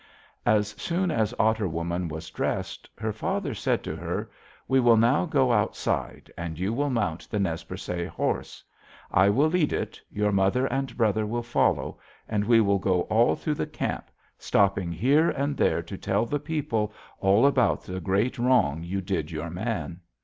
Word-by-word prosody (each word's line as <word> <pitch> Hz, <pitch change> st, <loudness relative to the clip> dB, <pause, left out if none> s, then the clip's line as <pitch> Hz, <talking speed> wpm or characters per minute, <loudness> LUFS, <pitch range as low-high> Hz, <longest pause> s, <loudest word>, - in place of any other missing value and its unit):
"As 105 Hz, -1 st, +3 dB
soon 175 Hz, +1 st, 0 dB
as 110 Hz, -5 st, +1 dB
Otter 110 Hz, -2 st, +2 dB
Woman 85 Hz, +1 st, -2 dB
was 80 Hz, 0 st, -7 dB
dressed, -, -, -3 dB
her 110 Hz, -1 st, -2 dB
father 110 Hz, -, -2 dB
said -, -, -1 dB
to -, -, -4 dB
her: -, -, -4 dB, 0.4 s
'We 130 Hz, 0 st, +3 dB
will 120 Hz, -2 st, +5 dB
now 120 Hz, +10 st, +3 dB
go 135 Hz, -5 st, +2 dB
outside, 105 Hz, -3 st, -1 dB
and 85 Hz, -2 st, -5 dB
you 95 Hz, +5 st, -1 dB
will 145 Hz, +4 st, 0 dB
mount 100 Hz, -10 st, -2 dB
the 105 Hz, -, -1 dB
Nez 85 Hz, -5 st, -1 dB
Percé 85 Hz, -1 st, -4 dB
horse. -, -, -3 dB, 0.5 s
I 95 Hz, +2 st, +5 dB
will 135 Hz, +9 st, +3 dB
lead 160 Hz, -2 st, +1 dB
it, -, -, -3 dB
your 105 Hz, 0 st, 0 dB
mother 100 Hz, +6 st, +2 dB
and 135 Hz, +1 st, -2 dB
brother 110 Hz, -2 st, +2 dB
will 120 Hz, +2 st, -2 dB
follow, 120 Hz, -, 0 dB, 0.3 s
and 105 Hz, -2 st, 0 dB
we 115 Hz, 0 st, +5 dB
will 100 Hz, -2 st, +2 dB
go 90 Hz, -2 st, +1 dB
all 115 Hz, +2 st, +4 dB
through 155 Hz, -, -2 dB
the -, -, -3 dB
camp, -, -, -4 dB, 0.3 s
stopping 100 Hz, -3 st, +2 dB
here 135 Hz, -, +3 dB
and 140 Hz, +1 st, -1 dB
there 85 Hz, -, +1 dB
to 95 Hz, +3 st, -7 dB
tell 100 Hz, +3 st, 0 dB
the 145 Hz, +5 st, -2 dB
people 135 Hz, -8 st, -2 dB, 0.3 s
all 100 Hz, +5 st, +4 dB
about 135 Hz, -4 st, +3 dB
the 95 Hz, 0 st, -5 dB
great 105 Hz, +8 st, 0 dB
wrong 120 Hz, -, +3 dB
you 95 Hz, +3 st, -3 dB
did 90 Hz, -5 st, -2 dB
your 80 Hz, +1 st, -5 dB
man.' 90 Hz, -4 st, -3 dB
105 Hz, 180 wpm, -26 LUFS, 95-125 Hz, 0.5 s, will